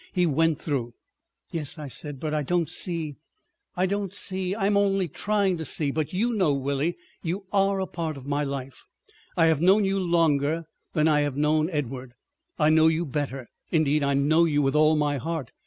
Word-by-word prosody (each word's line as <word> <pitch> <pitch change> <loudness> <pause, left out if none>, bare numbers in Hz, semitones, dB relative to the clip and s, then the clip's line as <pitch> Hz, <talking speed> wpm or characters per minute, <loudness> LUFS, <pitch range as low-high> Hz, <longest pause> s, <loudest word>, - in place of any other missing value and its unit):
he 180 -2 +2
went 160 0 +2
through." 125 -6 -3 0.6
"Yes," 155 -4 -4
I 150 -2 -6
said, 145 +1 -5
"but 155 +1 -3
I 155 - +1
don't 170 +3 0
see———" 160 -5 -3 0.6
"I 180 - +2
don't 200 0 -2
see. 190 -1 0
I'm 205 -1 +1
only 195 -2 +2
trying 200 +2 0
to - - -3
see. 145 -1 +1
But 155 0 -2
you 230 +6 0
know, 185 -9 +2
Willie, 140 +4 -1 0.2
you 185 +4 -3
are 195 0 +2
a 190 - 0
part 165 -5 -4
of 135 - -11
my 145 +1 -1
life. 135 -2 -6 0.5
I 165 - +5
have 160 -2 +2
known 195 +4 +5
you 195 0 0
longer 165 -3 +1 0.3
than 155 -1 +2
I 150 -2 +3
have 145 -2 -2
known 155 +2 +2
Edward. 130 -5 -4 0.4
I 150 - +3
know 160 0 +5
you 160 +1 +1
better. 135 -3 -4 0.2
Indeed 155 -2 +2
I 140 0 +1
know 155 +5 +4
you 145 -3 +1
with 135 +2 +1
all 155 +1 +5
my 145 -1 +1
heart. 160 -1 -4
155 Hz, 195 wpm, -26 LUFS, 145-180 Hz, 0.6 s, I